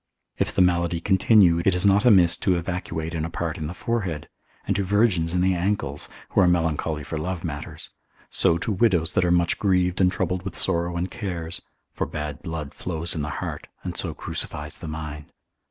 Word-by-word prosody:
If - - 0
the 95 - +5
malady 85 -1 +1
continue, 95 -1 +4
it 95 -1 +3
is 90 +2 +2
not 100 +2 +4
amiss 90 -8 +6
to 95 - +1
evacuate 85 -2 -3
in 80 -2 -2
a 80 - -2
part 85 -1 -3
in 75 - -3
the 85 - -5
forehead, 95 -10 -2 0.4
and 100 - 0
to 100 - +1
virgins 95 -4 +2
in 90 0 +1
the 95 +1 +3
ankles, 85 -6 -2 0.2
who - - +3
are 90 - +5
melancholy 80 -3 0
for 80 +2 -4
love 90 +2 -3
matters; 75 -4 -6 0.4
so 85 - +3
to 95 - -2
widows 90 -5 +2
that 90 - +3
are - - +2
much 85 -1 +2
grieved 90 -2 +2
and 90 0 +4
troubled 90 0 -1
with 95 -2 -6
sorrow 85 +1 +2
and 90 +2 -2
cares: 90 -6 -5 0.3
for - - -2
bad 75 0 -5
blood 80 -4 -5
flows 85 -1 -2
in 80 - -2
the 75 - -3
heart, - - -5 0.2
and - - -4
so - - -2
crucifies 75 +1 -5
the 80 - -7
mind. 75 -1 -6
85 Hz, 200 wpm, -24 LUFS, 80-95 Hz, 0.4 s, amiss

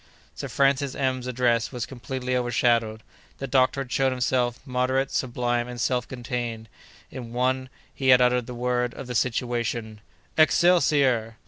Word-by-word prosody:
Sir - - -6
Francis 140 0 +1
M——'s 130 -2 -1
address 120 -2 +1
was 125 -2 -4
completely 130 0 -4
overshadowed. 115 -3 +1 0.3
The 135 - -5
doctor 130 +1 +2
had 125 -2 -7
shown 135 -1 +2
himself 125 -1 0
moderate, 130 +1 0
sublime, 120 -1 -1
and 125 -1 -7
self 125 0 0
contained, 120 -3 -5 0.4
in 120 -2 -8
one; 130 +1 0 0.2
he 135 - -3
had 130 -1 +7
uttered 125 -1 +2
the 125 - -7
word 125 0 -1
of - - -7
the 125 - -6
situation— 120 -3 -2 0.4
"Excelsior!" 145 -9 +3
125 Hz, 145 wpm, -25 LUFS, 120-130 Hz, 0.4 s, had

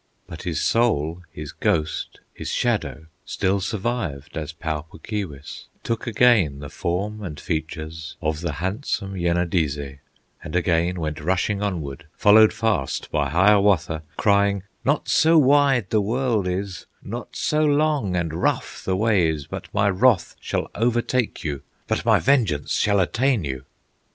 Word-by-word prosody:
But 85 -2 -8
his 85 -3 -2
soul, 90 -8 +1
his 75 -2 -7
ghost, 80 0 -1
his - - -6
shadow, 80 - -1 0.2
Still 95 +1 0
survived 100 - -3
as 80 -1 -4
Pau 80 -2 -3
Puk 80 - -16
Keewis, 85 -10 -5 0.2
Took 115 0 -3
again 110 - +4
the 70 -1 -8
form 100 +5 -3
and 85 -7 -6
features 80 0 -5
Of 80 -1 -2
the 85 -4 -2
handsome 95 - -3
Yenadizze, 85 -6 -1 0.4
And 75 +3 -6
again 85 +1 +1
went 75 -2 -3
rushing 95 +5 0
onward, 85 -6 -4
Followed 110 +1 +7
fast 110 - -1
by 70 -2 0
Hiawatha, 95 -2 +3 0.2
Crying: 100 -2 +2 0.2
"Not 145 +2 +1
so 160 +1 +4
wide 140 -6 +4
the 110 - +3
world 115 -2 0
is, 90 0 -4 0.2
Not - - -7
so 155 0 +1
long 145 -9 +2
and 85 -3 -1
rough 80 - -1
the 95 - 0
way 105 -5 +3
is, 75 -3 -3
But - - -8
my 100 - +2
wrath 100 +1 +3
shall - - -3
overtake 120 +1 0
you, 70 -4 -3 0.3
But - - -1
my - - +5
vengeance 115 - +1
shall 100 -1 +2
attain 115 +4 +1
you!" 65 -2 -5
95 Hz, 145 wpm, -23 LUFS, 80-110 Hz, 0.4 s, Followed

